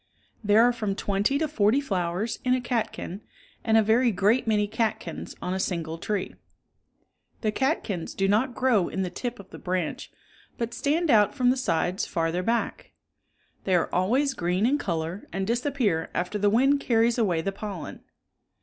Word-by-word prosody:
There 210 +2 +5
are 245 0 +4
from 210 -4 -2
twenty 205 +6 0
to 315 +1 0
forty 230 -3 +2
flowers 190 -4 -2
in 255 0 +3
a - - 0
catkin 230 -5 -3 0.4
and 225 -1 +3
a 220 - +5
very 235 +4 +3
great 210 +6 +2
many 210 -2 +2
catkins 220 0 -3
on 180 - -2
a 190 - -2
single 165 -3 -3
tree. 205 +1 -3 1.1
The 215 - +1
catkins 215 - -2
do 195 - +1
not 230 +5 +1
grow 235 -8 +2
in 190 - -2
the 180 - -4
tip 245 +5 -5
of 200 - -13
the - - -9
branch, 180 -3 -3 0.5
but 235 0 -3
stand 315 +4 +1
out 210 0 +4
from 250 -2 +3
the - - +1
sides 180 -6 -1
farther 165 +1 -1
back. 230 +4 -2 0.7
They 190 - +2
are 170 - 0
always 255 +10 +2
green 180 +2 0
in 285 +4 +2
color 170 - -3
and 195 +2 -2
disappear 235 - 0
after 180 +4 -2
the 205 0 +3
wind 270 +6 +3
carries 235 -2 +2
away 180 -7 +1
the 195 - -1
pollen. 195 -4 -7
210 Hz, 175 wpm, -26 LUFS, 185-245 Hz, 1.1 s, There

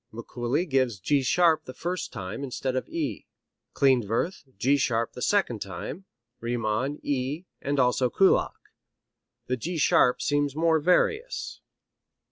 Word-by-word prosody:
Mikuli 120 +8 -2
gives 130 -7 +1
G 140 +9 +2
sharp 165 +4 +3
the 130 - -9
first 180 +5 -3
time 100 +3 -6
instead 130 -1 -3
of 130 - -3
E; 145 - -4 0.5
Klindworth, 130 - +1
G 130 +7 +3
sharp 115 -4 0
the 125 - -9
second 190 - +1
time; 100 - -6 0.3
Riemann, 120 +4 -1
E, 140 +4 -2 0.2
and 140 0 -1
also 125 0 +3
Kullak. 195 +9 +3 0.9
The 125 - -1
G 170 +8 -4
sharp 125 -3 +4
seems 145 -1 0
more 160 0 +3
various. 440 - 0
135 Hz, 130 wpm, -26 LUFS, 120-160 Hz, 0.9 s, sharp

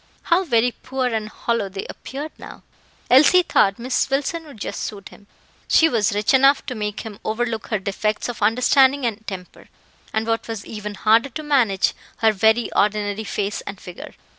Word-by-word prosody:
How 365 +3 +3
very 245 -6 +2
poor 260 +1 -3
and 215 -1 -2
hollow 230 -3 -2
they 195 0 -6
appeared 290 +4 -7
now! - - -11 0.5
Elsie 305 +8 +7
thought 195 - +2
Miss 245 +2 -1
Wilson 290 +5 -1
would 285 -8 -13
just - - -5
suit 200 -2 -6
him. 200 - -18 0.4
She 325 - +5
was 215 -8 +1
rich 210 +5 +1
enough 270 +1 +5
to 260 - -4
make 210 -2 -4
him 215 -3 -9
overlook 225 0 -2
her 215 - 0
defects 205 +2 -2
of 245 -3 -6
understanding 255 +5 +4
and 220 -1 -3
temper, 185 -2 -9 0.4
and 220 0 -1
what 225 0 -1
was 225 -3 -6
even 210 -1 -6
harder 225 +6 +3
to 310 +5 -7
manage, 245 -10 +2 0.2
her 220 -1 +4
very 220 +3 +2
ordinary 205 0 0
face 205 0 -3
and 200 -1 -6
figure. 180 -1 -10
225 Hz, 180 wpm, -21 LUFS, 210-260 Hz, 0.5 s, Elsie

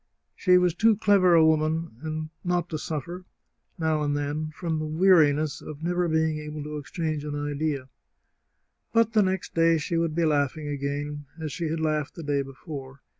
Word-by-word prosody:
She 180 -2 +4
was 180 -2 +3
too 220 +3 +3
clever 185 -3 +5
a 160 -1 +6
woman 155 -1 -1
not 175 -1 0
to 155 - -3
suffer, 170 +5 -5 0.5
now 160 -2 +1
and 145 -1 0
then, 145 +2 -2
from 165 -2 -2
the 155 - -3
weariness 155 -3 +3
of 155 +1 -9
never 175 +1 +1
being 160 -1 +1
able 150 0 -6
to 150 0 -5
exchange 155 0 -3
an 150 -1 -4
idea. 145 -2 -2 1.1
But 230 -1 +3
the 215 - +5
next 190 -2 -1
day 165 0 +4
she 165 +2 -2
would 165 -2 0
be 170 -1 +2
laughing 150 0 0
again, 145 +1 -4
as 155 -2 -4
she 170 +1 -3
had 160 +1 -2
laughed 155 -2 -1
the 165 - -7
day 145 -1 0
before. 135 0 -9
155 Hz, 175 wpm, -26 LUFS, 145-170 Hz, 1.1 s, a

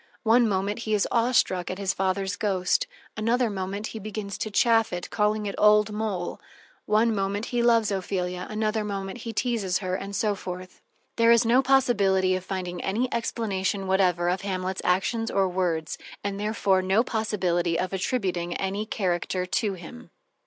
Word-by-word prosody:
One 230 0 +4
moment 200 +2 -1
he 215 -2 0
is 205 - +1
awe 235 +1 +2
struck 185 -7 +2
at 185 - -4
his 195 -1 0
father's 195 +1 -1
ghost, 190 -3 +1 0.3
another 230 +2 +1
moment 195 +2 -4
he 220 - -5
begins 210 -1 -5
to 215 - -2
chaff 225 +1 +3
it, 175 0 -5
calling 210 0 +1
it 200 - -3
"old 210 0 +5
mole"; 210 -5 -3 0.5
one 220 +2 +3
moment 200 +1 -1
he 240 - +2
loves 230 -3 +3
Ophelia, 180 -2 -2
another 215 0 -1
moment 195 -2 -4
he 230 - -5
teases 225 -6 0
her, 185 -3 -3
and 195 +2 -4
so 210 +1 +1
forth. 185 -1 -8 0.4
There 230 0 +5
is 235 0 +5
no 240 +3 +5
possibility 200 -9 +3
of 185 - -4
finding 180 -2 -4
any 235 +6 -1
explanation 200 -4 -1
whatever 185 -2 +2
of 180 +2 0
Hamlet's 190 -1 -3
actions 225 +5 +1
or 195 -1 +2
words, 175 -4 -1 0.2
and 200 0 -3
therefore 205 -3 +1
no 190 +5 +3
possibility 180 -7 0
of 185 +1 -2
attributing 185 -4 -1
any 200 +3 -2
character 180 -2 -1
to 190 +4 0
him. 165 - -11
200 Hz, 170 wpm, -26 LUFS, 185-220 Hz, 0.5 s, old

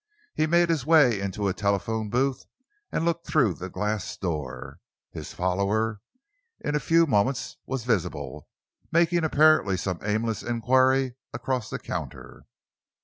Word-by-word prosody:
He 155 - +1
made 170 +1 +3
his 160 -5 +1
way 145 -9 +5
into 100 +1 -2
a 95 - +1
telephone 105 +2 -1
booth 130 +3 0 0.4
and 165 - -1
looked 170 0 -1
through 130 - +3
the 90 +3 -7
glass 105 +1 -3
door. 70 -6 -5 0.3
His - - -8
follower 100 +4 0 0.6
in 150 - -3
a 150 - +2
few 165 +4 +4
moments 130 0 0
was 135 -3 -3
visible, 115 -8 -2 0.4
making 170 +1 +3
apparently 155 -10 +4
some 90 -2 -3
aimless 110 +1 -1
enquiry 130 +2 +2 0.2
across 125 -1 -2
the - - -3
counter. - - -7
120 Hz, 140 wpm, -26 LUFS, 100-150 Hz, 0.6 s, way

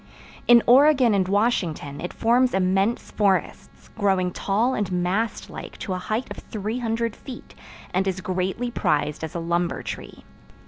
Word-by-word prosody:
In 240 -1 +7
Oregon 260 -2 +6
and 190 -2 +1
Washington 185 -9 0
it 175 - -4
forms 245 +1 +2
immense 195 +4 +1
forests, 200 -3 -1
growing 190 -4 +1
tall 215 +8 0
and 205 -5 -2
mast 185 +6 -1
like - - -9
to 190 - -4
a 185 - -3
height 215 +7 -2
of - - -6
300 225 +1 -3
feet, 260 -3 -11 0.4
and 190 +2 +1
is 190 -1 -1
greatly 185 +6 -2
prized 150 -6 0
as 160 +3 -6
a - - -1
lumber 170 +1 -1
tree. - - -8
200 Hz, 150 wpm, -24 LUFS, 180-235 Hz, 0.4 s, In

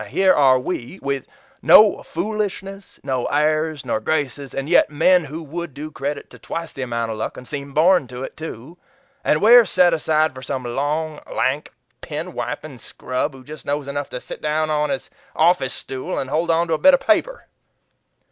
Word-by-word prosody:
Here 190 - +3
are 135 -3 +5
WE, 130 +3 -5
with 140 -1 -2 0.3
no 215 -2 +7
foolishness, 195 +1 -4
no 130 -2 -1
airs 155 -1 0
nor 125 +2 0
graces, 140 -3 -2
and 135 +1 -3
yet 175 -1 +4
men 165 +3 +3
who 155 +4 -7
would 160 -1 -6
do 155 +2 -7
credit 140 0 -4
to - - -14
twice 165 0 -5
that 135 - -7
amount 115 -2 -2
of 110 - -6
luck - - -4
and 125 - -10
seem 140 -1 -6
born 165 0 +4
to 125 +1 -7
it, - - -7
too 160 +1 -9 0.4
and 150 - +1
we're 240 +2 +9
set 180 -4 +3
aside 155 -1 +1
for 130 - -10
some 130 0 -4
long, 150 +5 -2
lank, 140 +4 -1 0.3
pen 160 +4 -5
wiping 145 -3 -5
scrub 130 +5 -4
who 130 - -13
just 150 +1 -10
knows 145 0 -2
enough 145 0 -4
to 125 - -5
sit - - -9
down 155 +1 0
on 150 0 +1
his 135 -1 -4 0.2
office 160 -5 +3
stool 130 -1 -5
and 135 - -3
hold 165 +3 0
on 165 +1 +2
to - - +1
a 155 - 0
bit 280 -1 +7
of - - -2
paper." 340 - 0
150 Hz, 195 wpm, -21 LUFS, 135-170 Hz, 0.4 s, we're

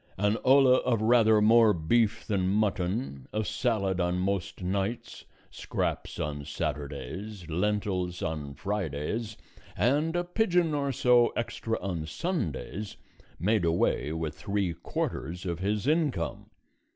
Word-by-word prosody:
An 105 +3 +2
olla 130 -1 +6
of 125 -4 +1
rather 110 -1 +5
more 110 0 +6
beef 110 +7 +1
than 95 -4 0
mutton, 100 - -1
a 110 0 -1
salad 100 -7 0
on 90 0 +1
most 95 0 -2
nights, 100 +5 -3 0.3
scraps - - -3
on 75 -1 -3
Saturdays, 75 +7 -5
lentils 90 0 -1
on 75 -3 -4
Fridays, 100 +3 -3 0.4
and 150 +8 +2
a 175 - +1
pigeon 175 -3 +1
or 140 -1 0
so 120 -1 +4
extra 115 -1 -2
on 90 -4 -3
Sundays, 100 - -3 0.4
made 105 +3 +1
away 80 -3 +1
with 80 -2 -3
three 100 0 -2
quarters 85 +1 -4
of 85 -2 -2
his 105 +3 -1
income. 145 - 0
100 Hz, 125 wpm, -28 LUFS, 85-115 Hz, 0.4 s, olla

